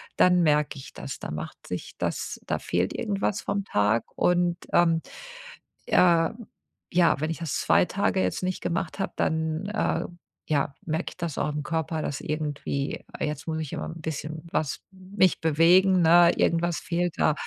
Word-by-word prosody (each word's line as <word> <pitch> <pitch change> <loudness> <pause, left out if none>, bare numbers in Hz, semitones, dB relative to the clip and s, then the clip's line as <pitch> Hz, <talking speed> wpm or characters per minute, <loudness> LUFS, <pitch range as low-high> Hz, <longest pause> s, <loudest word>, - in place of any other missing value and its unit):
dann 180 -1 +5
merke 150 -2 +2
ich 130 - -11
das, - - -7
da - - -6
macht 75 0 -7
sich - - -6
das - - -3
da - - -1
fehlt 90 +2 -1
irgendwas 205 -2 -1
vom 200 -1 -2
Tag 105 - +1
und, 175 -1 +2 0.2
ähm, 165 -1 +4 0.9
äh, 170 -2 +4 0.6
ja, 175 -4 +4
wenn 155 +2 -1
ich 165 - -5
das 165 -4 -3
2 - - +4
Tage - - 0
jetzt 90 - -1
nicht 185 0 -2
gemacht 170 +1 -2
habe, 195 - -2
dann, 160 +2 -1
äh, 215 - 0 0.4
ja, 140 -2 0
merke 160 +2 -1
ich - - -16
das 170 -4 -4
auch - - 0
im 150 0 -3
Körper, 160 +1 -2
dass 140 - -3
irgendwie 145 -2 -3 0.2
jetzt 150 0 -3
muss 160 -1 -2
ich 155 -3 -5
immer - - -3
'n 165 - -8
bisschen 155 +1 -5
was 150 -3 -1
mich 190 0 +1
bewegen, 175 +4 +5
ne, 170 +1 +7
irgendwas 170 0 +1
fehlt 175 -1 -1
da. - - +3
165 Hz, 170 wpm, -26 LUFS, 150-175 Hz, 0.9 s, ne